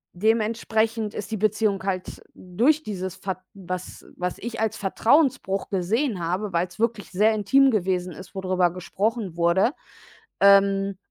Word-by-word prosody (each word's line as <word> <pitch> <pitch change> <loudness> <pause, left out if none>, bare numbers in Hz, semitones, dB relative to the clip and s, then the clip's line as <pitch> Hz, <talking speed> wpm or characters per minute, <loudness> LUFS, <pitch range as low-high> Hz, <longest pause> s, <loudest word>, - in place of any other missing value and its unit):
dementsprechend 220 +1 0
ist 205 +1 -6
die 220 - -1
Beziehung 215 -1 +1
halt 185 -2 -4
durch 250 - +1
dieses 190 -3 -5
fat 190 -1 -5 0.2
was 185 -1 -7
was 180 0 -3
ich 230 +1 -6
als 220 0 -1
Vertrauensbruch 220 -1 +1
gesehen 205 +4 0
habe, 185 +3 -2
weil's 175 +3 -2
wirklich 225 -3 -1
sehr 210 +4 +3
intim 265 +6 +4
gewesen 180 -3 -1
ist, 185 +4 -12
wo 190 - -3
drüber 185 -1 +2
gesprochen 195 +1 -2
wurde, 170 +8 +3 0.7
ähm 195 0 +4
200 Hz, 140 wpm, -24 LUFS, 185-220 Hz, 0.7 s, intim